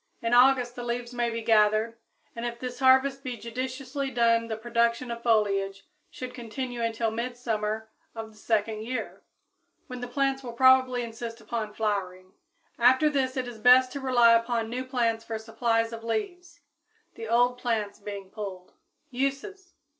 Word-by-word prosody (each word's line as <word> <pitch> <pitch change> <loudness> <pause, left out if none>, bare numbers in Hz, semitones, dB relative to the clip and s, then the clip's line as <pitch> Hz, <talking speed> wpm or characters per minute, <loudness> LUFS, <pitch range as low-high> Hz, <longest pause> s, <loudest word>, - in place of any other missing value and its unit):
In 230 +1 -1
August 250 -1 +5
the 245 - -6
leaves 240 0 -4
may 240 -1 0
be 230 0 -4
gathered, 220 +1 +3 0.4
and 230 - -5
if 235 0 -3
this 250 +1 -6
harvest 265 +1 +4
be 250 -3 -4
judiciously 260 +4 -4
done 230 -2 +2
the 220 -1 -4
production 235 +1 0
of 235 0 -5
foliage 200 -4 +1 0.2
should 255 -1 -7
continue 245 +1 -5
until 230 -1 -1
midsummer 220 -2 -3 0.3
of 225 -1 -7
the 215 - -20
second 215 -1 0
year, 250 +3 -5 0.6
when 250 -2 -8
the 245 - -4
plants 270 +1 0
will 245 -3 -7
probably 255 0 +4
insist 230 0 -7
upon 215 -1 -4
flowering. 185 -3 -3 0.5
After 260 +5 +5
this 265 -2 0
it 255 -1 -2
is 235 -2 -9
best 255 +2 +6
to 280 - -5
rely 245 -3 +5
upon 230 -1 +1
new 255 +2 -3
plants 235 -3 0
for 225 -1 -4
supplies 230 +1 -1
of 225 0 -7
leaves, 340 - -4 0.5
the 225 - -7
old 245 +2 +2
plants 220 -5 -2
being 200 -2 -8
pulled. 195 -4 -7 0.4
_Uses. 275 +9 -3
235 Hz, 160 wpm, -27 LUFS, 225-255 Hz, 0.6 s, best